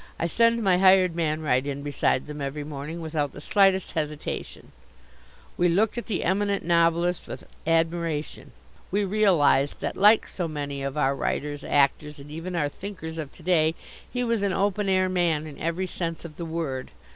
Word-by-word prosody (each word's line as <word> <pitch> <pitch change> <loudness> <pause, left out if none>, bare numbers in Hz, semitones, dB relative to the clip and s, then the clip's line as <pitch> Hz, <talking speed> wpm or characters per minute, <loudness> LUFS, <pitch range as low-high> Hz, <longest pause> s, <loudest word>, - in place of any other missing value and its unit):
I - - -1
send 230 +6 +2
my 185 -3 +3
hired 185 -2 +5
man 155 -2 -1
right 130 -3 +2
in 140 0 -4
beside 145 -2 0
them 150 0 -7
every 140 +2 -4
morning, 150 +3 -6
without 155 -3 -2
the - - -9
slightest 190 +3 +3
hesitation." 150 -1 -5 0.9
We 175 0 +3
looked 205 +5 +2
at 240 - -5
the 205 - -1
Eminent 200 +1 0
Novelist 170 +1 +2
with - - -8 0.2
admiration. 165 -2 -1 0.4
We 200 +2 +1
realized 180 -9 +3
that - - -2
like 210 +3 +5
so 175 -3 -4
many 145 -3 -4
of 135 +1 -4
our 140 -2 +2
writers, 145 +1 -3
actors, 145 +1 +1
and 145 +1 -12
even 165 +4 -5
our 150 -4 +1
thinkers, 165 -1 -7
of 145 -3 -5
to 170 - -16
day, 160 -2 +3 0.4
he 245 -1 -1
was 230 -3 0
an 200 -2 0
open 200 +1 0
air 185 0 +3
man 170 -4 +1
in 150 -2 -10
every 170 +3 -1
sense 170 -2 -4
of 155 -3 -10
the 170 - -4
word. 160 -6 -3
165 Hz, 180 wpm, -26 LUFS, 150-185 Hz, 0.9 s, hired